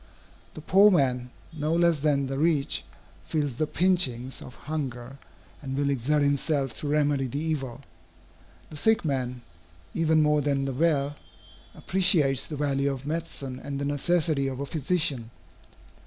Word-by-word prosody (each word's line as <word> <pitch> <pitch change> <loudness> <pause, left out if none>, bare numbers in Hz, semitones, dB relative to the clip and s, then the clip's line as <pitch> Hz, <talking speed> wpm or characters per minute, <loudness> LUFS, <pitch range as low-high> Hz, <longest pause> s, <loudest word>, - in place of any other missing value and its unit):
The 155 - -7
poor 195 +6 +6
man, 125 -8 +1 0.2
no 155 +1 -1
less 170 -2 +3
than 140 -1 +1
the 135 +1 -3
rich, 155 -3 +1 0.4
feels 150 -4 -1
the 155 +6 -1
pinchings 145 -9 +1
of 125 - -11
hunger, 135 -4 -5 0.4
and 135 -2 -4
will 140 0 +1
exert 140 +3 +1
himself 140 -1 0
to 150 - -4
remedy 145 -2 +1
the 130 - -5
evil. 145 -5 -3 0.9
The 150 - -8
sick 220 +4 +2
man, 125 -4 -2 0.5
even 160 -1 +3
more 150 0 +3
than 140 -1 0
the 135 - -2
well, 145 -1 +1 0.6
appreciates 160 -8 +2
the 150 - -6
value 140 -1 0
of 135 0 -6
medicine 145 -5 -4
and 140 -1 -4
the 140 - -2
necessity 145 0 +1
of 130 -1 -4
a 140 - -2
physician. 145 -5 -1
145 Hz, 150 wpm, -27 LUFS, 135-155 Hz, 0.9 s, poor